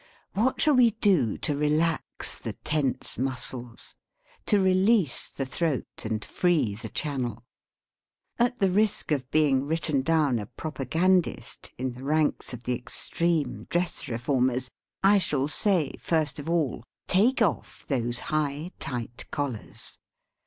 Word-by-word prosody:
What 235 +6 +1
shall 305 - +5
we 250 -3 +6
do 170 - +3
to 150 - +1
relax 155 +2 0
the - - -6
tense 145 -6 -1
muscles, 125 -2 -2 0.5
to 205 - +4
release 190 - +2
the 135 - -4
throat 140 -1 -3
and 110 -1 -2
free 165 - +1
the 110 +2 -8
channel? 125 -6 -3 1.0
At 245 +1 +2
the 195 -4 +2
risk 210 -3 +1
of 135 -4 -1
being 140 -3 +2
written 155 -3 +1
down 145 -4 +2
a 105 - -6
propagandist, 160 +7 -1
in 130 0 -3
the 125 +2 -11
ranks 150 +1 0
of 125 -1 -8
the 125 - -1
extreme 160 +6 0
dress 175 0 -1
reformers, 125 +1 0 0.3
I 200 +1 +6
shall 140 -6 0
say, 175 0 +3
first 155 -3 +1
of 145 - -6
all, 155 -9 0 0.2
take 225 +8 +3
off 200 -10 -1
those 120 -3 0 0.2
high, 155 +2 -1
tight 120 -2 -5
collars. 140 -7 -6
150 Hz, 135 wpm, -27 LUFS, 130-175 Hz, 1.0 s, we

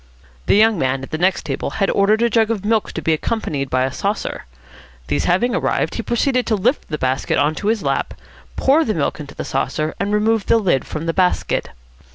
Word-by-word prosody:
The - - +4
young 215 -2 +4
man 130 -1 0
at - - -9
the 155 - -3
next 185 +2 +1
table - - -3
had 195 -2 +2
ordered 210 +3 +3
a 235 - +3
jug 225 0 +3
of 210 -3 -2
milk 220 0 +1
to 160 - -5
be 160 - +2
accompanied 150 -6 -2
by 130 0 +1
a 135 - -1
saucer. 200 +9 -3 0.6
These 75 +1 0
having 240 - +2
arrived, - - 0
he - - -3
proceeded 250 +1 0
to 220 - +2
lift 240 +8 0
the 150 - -3
basket 130 -1 0
on 145 +3 +2
to 205 - -2
his 220 -3 +1
lap, 135 -1 -1 0.4
pour 290 +5 +3
the 215 - -1
milk 155 -1 -1
into 145 -2 -9
the - - -5
saucer, 155 +1 -2
and 200 - -1
remove 215 0 +1
the - - +5
lid 185 -11 +1
from 155 +1 -5
the 165 - -1
basket. 180 0 0
195 Hz, 220 wpm, -19 LUFS, 150-225 Hz, 0.6 s, the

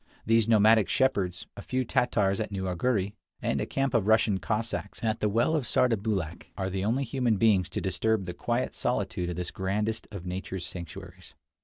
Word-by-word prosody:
These 115 0 +3
nomadic 110 -1 +5
shepherds, 100 -9 +1
a - - -7
few 130 +4 -1
Tatars 105 -5 +1
at 110 -1 -3
New 95 -1 -3
Arghuri, 95 +2 0 0.3
and - - -1
a - - -2
camp 135 -2 -1
of 110 -4 +2
Russian 110 -3 +4
Cossacks 110 +3 -3
at 110 -1 0
the 105 - +1
well 120 +9 +2
of 145 -5 0
Sardarbulakh, 105 -10 0
are 95 -1 -2
the 95 0 -2
only 120 +7 +1
human 120 -3 0
beings 100 -5 +3
to - - -3
disturb 95 +3 0
the 90 - -5
quiet 120 +6 -1
solitude 100 -7 -1
of 90 - -3
this 90 +1 -4
grandest 105 +4 -2
of 100 -5 -8
nature's 95 0 -4
sanctuaries. 90 0 -9
105 Hz, 185 wpm, -28 LUFS, 95-115 Hz, 0.3 s, nomadic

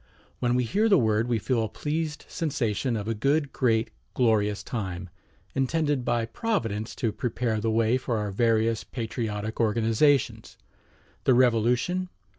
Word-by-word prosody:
When 120 -1 +1
we 125 - +2
hear 210 - +1
the 195 - +6
word 110 -2 +2
we 120 -2 +1
feel 115 +2 0
a 110 - -3
pleased 155 0 -3
sensation 125 - -1
of 105 0 -5
a 115 - 0
good, 140 +6 0
great, 115 -3 +1 0.2
glorious 105 -4 +2
time, 95 -7 -4 0.4
intended 145 0 0
by 120 -1 0
Providence 115 - -2
to 115 - -1
prepare 115 0 -2
the 115 - 0
way 115 +2 +2
for 120 -3 -2
our 105 -1 -2
various 115 +1 +1
patriotic 110 -3 -4
organizations. 115 +5 +2 0.7
The 130 - +5
Revolution? 125 +9 +2
115 Hz, 145 wpm, -26 LUFS, 110-130 Hz, 0.7 s, the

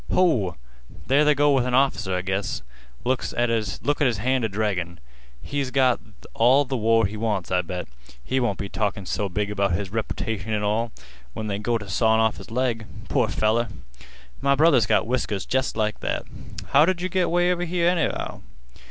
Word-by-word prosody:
Ho! 125 - +2 0.5
there 140 +3 +4
they 150 0 +4
go 145 +1 +4
with 135 -3 +3
an 125 0 0
off'cer, 110 -8 +2
I 90 - -2
guess. 95 +1 -2 0.4
Look 130 +1 +1 0.2
at 120 0 +3
his 115 +4 0
hand 130 +4 0
a 110 - 0
draggin'. 95 -4 -2 0.5
He's 140 -2 -2
got 130 -2 +3 0.3
all 130 +5 +4
th' 135 - -17
war 115 -2 +3
he 100 +2 -3
wants, 105 -5 -2
I 90 -1 +3
bet. 90 0 -5 0.4
He 130 - 0
won't 120 -6 0
be 100 - -4
talkin' 100 -1 -2
so 100 +2 -2
big 105 +3 -2
about 100 -2 +1
his 95 +2 -2
reputation 110 -1 -3
an' 105 -1 0
all 110 +3 0 0.4
when 110 - -5
they 100 -1 -2
go 115 +2 0
t' 105 -2 -9
sawin' 110 +3 +2
off 110 -1 +2
his - - -11
leg. 115 -2 -1 0.2
Poor - - +2
feller! 115 +2 +1 0.7
My 140 0 +3
brother's 140 -7 +4
got - - +3
whiskers 110 -5 -1
jest 130 -3 -1
like 110 -1 0
that. - - -2 0.5
How 145 - +6
did 180 +1 +1
yeh - - +1
git 185 0 +1
'way 175 +1 +3
over 175 0 -3
here, 170 0 +1
anyhow? 175 -2 -1
115 Hz, 190 wpm, -24 LUFS, 105-135 Hz, 0.7 s, How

